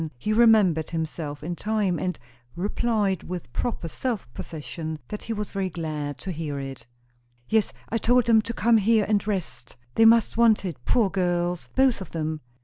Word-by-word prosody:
He 210 - -1
remembered 215 -9 +4
himself 160 -3 -4
in 175 +3 -3
time, 205 -4 0
and 180 +3 -2 0.4
replied 205 0 0
with 175 -9 -7
proper 225 -8 -2
self 220 - -3
possession 160 0 -6
that 210 - -5
he 230 - -6
was 210 -1 -4
very 195 -2 -1
glad 155 -4 -4
to 190 - -4
hear 155 -4 -4
it. 135 -3 -7 0.6
"Yes, 220 -1 +2 0.2
I 230 - 0
told 245 +1 +3
them 225 -2 +5
to 230 +2 -5
come 230 0 +4
here 220 0 +3
and 210 -1 +1
rest. 130 - -4 0.2
They 225 - +5
must 225 -1 +5
want 225 -3 +4
it, 155 -10 -6
poor 220 -6 +3
girls, 175 -2 -1
both 265 -5 +3
of 190 - -9
them." 155 -1 -2
190 Hz, 175 wpm, -25 LUFS, 160-220 Hz, 0.6 s, them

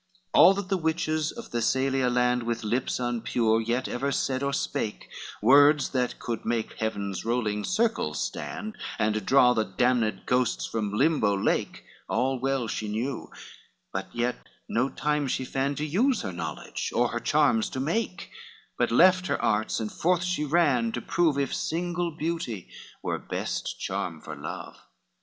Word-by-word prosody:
XXXVII 190 -1 0
All 185 - +9
what 200 -1 -4
the 195 - +2
witches 155 -2 0
of 235 - -10
Thessalia 130 +2 +1
land, 125 0 +2
With 115 0 -3
lips 120 +4 0
unpure 115 -2 +1
yet 120 +3 -1
ever 135 +3 -2
said 130 -1 0
or 140 0 0
spake, 140 -5 -2 0.4
Words 145 +4 +6
that 125 -2 -1
could 115 -2 -4
make 115 -1 -1
heaven's 100 -3 -2
rolling 110 -3 -1
circles 225 +4 0
stand, 215 0 -4 0.2
And 110 -1 0
draw 125 +1 +5
the 110 -2 +1
damned 110 0 +1
ghosts 125 -1 +1
from 105 -3 -2
Limbo 105 -4 +2
lake, 95 - -1 0.3
All 130 +2 +1
well 135 -2 0
she 110 0 -3
knew, 115 +5 -3 0.6
but 95 0 -3
yet 120 +1 -1 0.3
no 125 +4 +1
time 150 -1 -1
she 130 0 -1
fand 135 +2 -1
To 150 - -1
use 225 - +2
her 95 - -4
knowledge 85 - -4
or - - +3
her - - -2
charms 110 -1 +2
to 130 - -5
make, 180 +7 -2 0.5
But - - +2
left 185 +8 +5
her - - 0
arts, 110 +1 +1
and 110 -1 -3
forth 175 +1 +1
she 180 -4 -1
ran 140 -7 +2
to 120 - -3
prove 165 -5 +2
If 140 -2 0
single 175 +1 -1
beauty 155 - -4 0.3
were - - -1
best - - -4
charm 85 -3 -3
for 75 0 -8
love. 75 +2 -7
130 Hz, 165 wpm, -27 LUFS, 115-155 Hz, 0.6 s, All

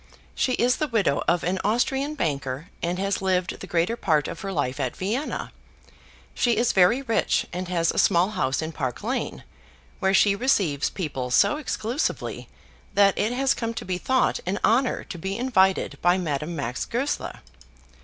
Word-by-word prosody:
She 255 - 0
is 245 +1 +2
the 305 - 0
widow 205 - +1
of 170 0 +2
an 185 +2 0
Austrian 270 +7 0
banker, 140 - -3
and 175 +1 -1
has 195 +1 -1
lived 185 -1 0
the - - -8
greater 175 +6 +1
part 155 -10 +1
of - - -6
her 195 -2 -4
life 145 -5 -2
at 130 -3 -2
Vienna. 225 +10 -3 0.8
She 235 -3 +1
is 235 +1 +3
very 195 +9 +4
rich, 230 -4 +1
and 180 +1 -3
has 170 -2 +1
a - - -1
small 180 +1 +3
house 135 -7 -1
in 160 - -4
Park 130 -3 -4
Lane, 250 +5 -3 0.6
where 190 -1 +2
she 200 0 +5
receives 195 - +1
people 140 -8 -4
so 125 - +4
exclusively 255 -2 -3 0.5
that 200 -1 +5
it 220 +3 0
has 270 +2 +2
come 230 -3 -4
to - - -5
be 180 -1 -2
thought 260 +4 +1
an 195 +2 0
honour 250 +3 +2
to 175 - -8
be 190 +3 -3
invited 190 - +2
by 175 +1 +4
Madame 155 -1 -2
Max 130 -4 -3
Goesler. 265 +5 -3
190 Hz, 175 wpm, -25 LUFS, 165-235 Hz, 0.8 s, she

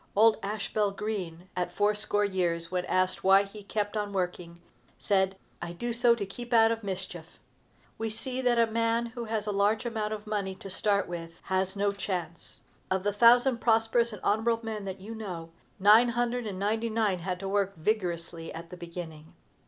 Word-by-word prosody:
Old 220 +2 +6
Ashbel 210 0 -1
Green, 190 -4 -5
at 180 -1 -1
fourscore 205 0 +1
years, 175 -3 -1
when 180 -1 -1
asked 185 0 0
why 195 +1 +6
he 200 +1 -10
kept 205 +1 -2
on 205 -1 -2
working, 180 -2 -3 0.4
said, 190 -1 +1 0.2
"I 175 0 -5
do 240 +7 -3
so 235 0 +4
to 210 -4 -3
keep 240 +5 -7
out 225 -1 +6
of 225 -1 -3
mischief." 190 -2 -6 0.6
We 225 0 -1
see 250 +4 -3
that 245 -2 +2
a 230 - +5
man 230 +1 +1
who 235 0 -6
has 220 -1 -2
a 210 - -1
large 205 +3 +1
amount 220 -3 -2
of 210 0 -6
money 200 -3 -2
to 195 - -8
start 200 +1 +1
with 170 -1 -5
has 190 0 -1
no 200 0 +1
chance. 180 -4 -5 0.3
Of 185 0 0
the 205 0 0
thousand 240 +3 +5
prosperous 230 +1 +3
and 210 - -8
honorable 225 +2 +1
men 215 -2 -4
that 190 0 -5
you 210 +4 -8
know, 180 -7 -6 0.3
nine 215 +5 +7
hundred 240 0 -1
and 195 -3 -5
ninety 220 +4 0
nine 215 -4 +1
had 180 +1 -3
to 195 - -4
work 195 0 0
vigorously 170 -3 -2
at 165 +1 -9
the 180 - -8
beginning. 170 -3 -8
205 Hz, 190 wpm, -29 LUFS, 185-225 Hz, 0.6 s, nine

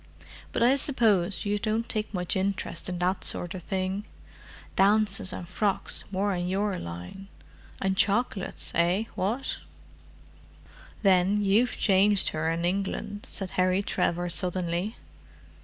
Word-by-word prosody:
But - - +1
I 255 +3 +5
suppose 215 - +1
you 205 0 0
don't 220 +2 -1
take 215 -1 -3
much 180 -3 -1
interest 195 0 -2
in 180 - -3
that 180 +2 0
sort 175 +1 -2
of 185 - -6
thing? 190 +3 -2 0.7
Dances 200 -1 +4
and 175 - -6
frocks 195 +2 -1
more 200 +1 0
in 175 -1 -2
your 195 0 0
line—and 190 - -7
chocolates, 205 -1 0
eh, 175 +5 +2
what?" 225 +8 -2 1.5
"Then 195 +1 +4
you've 215 +5 +3
changed 200 0 +4
her 155 +1 -1
in 165 +1 -1
England," 200 +2 -2
said 195 -2 -2
Harry 185 +1 +2
Trevor 175 -2 0
suddenly. 180 +3 -1
195 Hz, 125 wpm, -27 LUFS, 180-205 Hz, 1.5 s, I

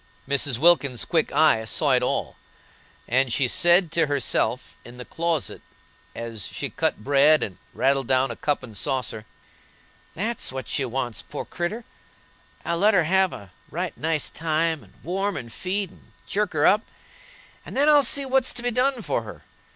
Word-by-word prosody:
Mrs. 140 -2 +1
Wilkins's 140 -5 +3
quick 160 -2 +1
eyes 140 -7 +3
saw 145 -3 +2
it 125 -1 +4
all, 125 - -2 0.7
and 130 +1 +2
she 130 +2 +2
said 175 +4 +4
to 165 -2 +2
herself, 135 -2 0
in 120 +1 -12
the 125 - -8
closet, 165 -3 -2 0.5
as 115 -3 -5
she - - -5
cut 105 - -1
bread 145 +3 +4
and 95 - -6
rattled 135 -1 +1
down 130 -1 +2
a - - -5
cup 145 +1 -1
and 115 -4 -10
saucer: 110 0 -3 0.9
"That's 220 +6 -2
what 130 0 -6
she 135 - -1
wants, 120 -2 -3
poor 145 - -7
creeter; 190 +7 -4 0.8
I'll 170 0 0
let 210 +2 +4
her 180 - +4
have 190 +3 +2
a 100 -2 -10 0.2
right 175 +2 -4
nice 160 -2 -1
time, 160 0 0
and - - -21
warm 195 +3 -2
and 115 -1 -8
feed 190 0 -3
and - - -21
chirk 205 -1 -1
her 150 -1 +2
up, 210 +2 +5 0.8
and - - -8
then 285 +2 +4
I'll 295 -1 +7
see 280 +1 0
what's 265 -1 +1
to 240 - -5
be 245 - 0
done 250 0 +1
for - - -1
her. - - -11
155 Hz, 175 wpm, -24 LUFS, 130-190 Hz, 0.9 s, I'll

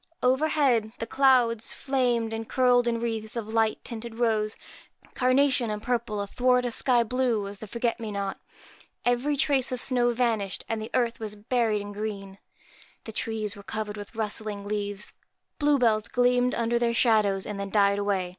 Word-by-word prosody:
Overhead, 260 -4 +2
the 230 - -3
clouds 240 -3 +3
flamed 245 -4 0
and 225 0 -5
curled 245 -1 +3
in 230 -1 0
wreaths 225 -1 -3
of 220 -2 -4
light 225 -1 +1
tinted 230 -1 -6
rose, 220 -2 0 0.6
carnation, 255 -1 +2
and 210 0 -2
purple, 230 -2 -2
athwart 250 +4 +2
a 245 - -1
sky 240 0 +2
blue 235 -3 0
as 200 0 -8
the 220 - -8
forget 235 +2 -1
me 220 -2 -5
not. 200 -1 -3 0.7
Every 245 +4 +1
trace 275 -3 +2
of 255 - -1
snow 245 -2 +2
vanished, 230 -5 -1
and 225 -1 -2
the 220 - -6
earth 240 -2 +1
was 215 -2 -4
buried 220 -1 0
in 205 0 -7
green. 200 -2 -6 0.6
The 220 - -7
trees 220 -1 -2
were 200 - -10
covered 210 +1 -4
with 205 +2 -9
rustling 210 -2 -4
leaves. 205 -1 -3 0.5
Blue 295 -1 +3
bells 215 -4 +2
gleamed 250 0 +2
under 235 0 +1
their 235 -1 +1
shadows, 210 -5 +3
and 210 -1 -5
then 200 0 -4
died 200 -1 +3
away. 195 -3 0
230 Hz, 175 wpm, -27 LUFS, 210-245 Hz, 0.7 s, clouds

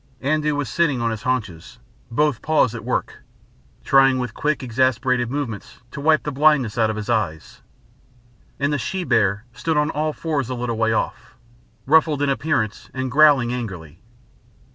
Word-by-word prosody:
Andoo 150 +1 +1
was 145 -2 -2
sitting 145 +1 +1
on 115 -1 0
his 110 -1 -5
haunches, 110 -10 -3 0.3
both 140 +1 0
paws 150 -7 +2
at 115 - -7
work, - - -3 0.6
trying 135 -1 +4
with 125 -4 -3
quick 150 -2 -1
exasperated 125 0 +1
movements 130 -6 -5
to 140 - -7
wipe 155 +1 +3
the 150 - -3
blindness 140 -5 +3
out 115 -2 +2
of 110 - -2
his 105 -1 -5
eyes, 110 -10 -2 1.0
and 140 +1 0
the 145 - -1
she 185 +10 -3
bear 105 - +1
stood 160 +5 -2
on 150 +1 +1
all 155 +1 -1
fours 145 -5 -3
a 130 - -3
little 120 -1 -3
way 115 0 +1
off, 110 - -3 0.5
ruffled 155 0 +3
in 140 - +1
appearance 135 -7 -1
and 130 -1 -3
growling 140 -4 +5
angrily. 90 -10 -7
130 Hz, 165 wpm, -21 LUFS, 115-150 Hz, 1.0 s, growling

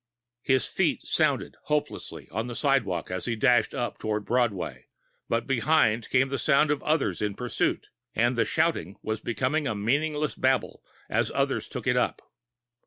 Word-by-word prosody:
His 130 -2 +2
feet - - 0
sounded - - 0
hopelessly 150 -1 -2
on 110 +2 -2
the 120 - -6
sidewalk 115 - 0
as 90 0 -2
he 115 - -1
dashed 120 -1 +3
up 120 - -3
toward 105 -1 -2
Broadway, 120 -6 -1 0.4
but 115 0 0
behind 120 -4 +2
came 130 +1 +3
the 135 -1 -2
sound 145 +5 +3
of 150 - 0
others 150 - 0
in 105 -1 -1
pursuit, 125 0 -1 0.3
and 120 +3 +2
the 115 - +3
shouting 100 - 0
was 110 0 -2
becoming 130 +7 -1
a 110 - -1
meaningless 150 +8 0
babble 130 -1 0 0.2
as - - +1
others - - 0
took - - -6
it - - +2
up. - - 0
120 Hz, 165 wpm, -27 LUFS, 110-140 Hz, 0.4 s, dashed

